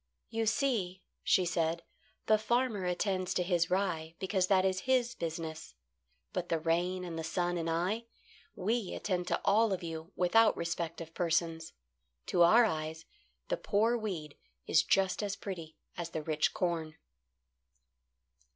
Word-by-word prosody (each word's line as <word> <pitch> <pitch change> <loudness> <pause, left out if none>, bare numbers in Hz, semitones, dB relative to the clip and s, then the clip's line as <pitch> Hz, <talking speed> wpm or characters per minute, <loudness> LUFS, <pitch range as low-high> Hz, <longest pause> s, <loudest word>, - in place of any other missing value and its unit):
"You 225 0 -1
see," 220 -7 0 0.2
she 185 - +3
said, 170 -1 0 0.4
"the 215 -1 +4
farmer 235 -3 0
attends 185 +1 -1
to 180 - +2
his 175 -2 +1
rye, 170 -4 -1
because 190 -1 0
that 190 -1 +4
is 190 -1 +1
his 245 -2 +3
business. 160 - -5 0.6
But - - -3
the 165 - +2
rain 175 +3 0
and 165 -2 -5
the - - -3
sun 175 +2 -1
and 165 -1 -2
I 185 +8 0 0.5
we 215 +1 -1
attend 180 -3 -2
to - - +1
all 215 +2 +4
of 185 -2 -2
you 165 +1 -6
without 215 +5 +4
respect 170 -1 -3
of 165 0 -9
persons. 165 -1 -1 0.5
To 175 - +1
our 220 +8 +7
eyes 160 -3 -3 0.4
the - - +1
poor 225 - +2
weed 180 -10 -4 0.3
is - - +4
just 190 0 +2
as 200 -1 -2
pretty 165 -5 -7 0.2
as 170 -1 -4
the 160 -2 -4
rich 155 -1 +1
corn." 165 -3 -2
180 Hz, 150 wpm, -32 LUFS, 165-205 Hz, 0.6 s, our